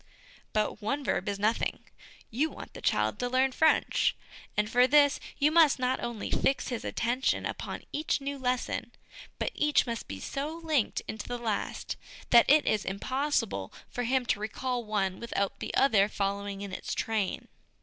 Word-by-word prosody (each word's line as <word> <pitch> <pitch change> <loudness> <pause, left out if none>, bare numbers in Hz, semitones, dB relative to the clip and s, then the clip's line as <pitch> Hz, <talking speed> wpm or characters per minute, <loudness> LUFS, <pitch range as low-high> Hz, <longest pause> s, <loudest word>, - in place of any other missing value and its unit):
But 215 0 -1
one 275 +7 -1
verb 225 - 0
is 200 - -2
nothing; 215 +3 0 0.5
you 285 +8 +1
want - - -10
the - - -9
child 105 0 +1
to 245 - -1
learn 260 +1 +3
French, 315 +4 +3 0.4
and 210 0 +2
for 245 +3 +4
this 285 +1 +5 0.2
you 295 +1 +3
must 320 -3 +6
not 255 0 0
only 235 -3 -4
fix 270 - +1
his 245 -3 -3
attention 245 +3 0
upon - - -5
each 305 +1 0
new 280 0 -4
lesson, 250 -1 -2 0.4
but - - -1
each 300 0 +3
must 230 -2 -4
be 95 - -6
so 295 - -4
linked 305 -8 +1
into 220 -1 -5
the 245 - -3
last 225 -4 -3 0.3
that 235 -1 +7
it 300 +1 +6
is 210 -2 +1
impossible 230 - -1 0.2
for 245 - -2
him 255 +1 +1
to 205 - 0
recall 245 +3 -2
one 200 -3 -1
without 200 -4 -2
the - - -4
other 210 -7 +4
following 200 0 -2
in 200 -1 -5
its - - -4
train. 215 -4 -1
240 Hz, 170 wpm, -29 LUFS, 210-275 Hz, 0.5 s, that